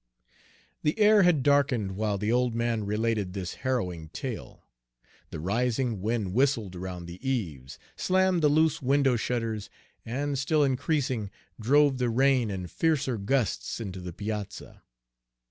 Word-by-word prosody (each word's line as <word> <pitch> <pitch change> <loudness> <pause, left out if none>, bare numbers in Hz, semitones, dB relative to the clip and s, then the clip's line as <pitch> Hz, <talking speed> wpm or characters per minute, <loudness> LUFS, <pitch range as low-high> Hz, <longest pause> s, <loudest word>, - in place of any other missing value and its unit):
The 150 - 0
air 210 -1 +6
had 175 -7 +4
darkened 135 -8 +2
while 105 0 -1
the 105 +3 -1
old 125 -1 +1
man 115 -2 0
related 105 -2 -1
this 95 -3 -4
harrowing 90 - -2
tale. 125 - -7 0.6
The - - -6
rising 115 - 0
wind 105 -3 -1
whistled 115 -6 +1
around 90 -1 -6
the 85 +1 -9
eaves, 80 - -3 0.2
slammed 185 -1 +2
the 150 - +4
loose 160 +2 +2
window 135 -1 +3
shutters, 115 -3 -2 0.3
and, 140 +4 -2
still 150 +2 +2
increasing, 130 -5 0 0.3
drove 140 +3 +3
the 125 -1 +1
rain 130 -1 +3
in 95 -2 -4
fiercer 135 - 0
gusts 110 +2 -1
into 95 -5 -6
the 90 -1 -6
piazza. 105 +2 -6
120 Hz, 140 wpm, -28 LUFS, 100-140 Hz, 0.6 s, air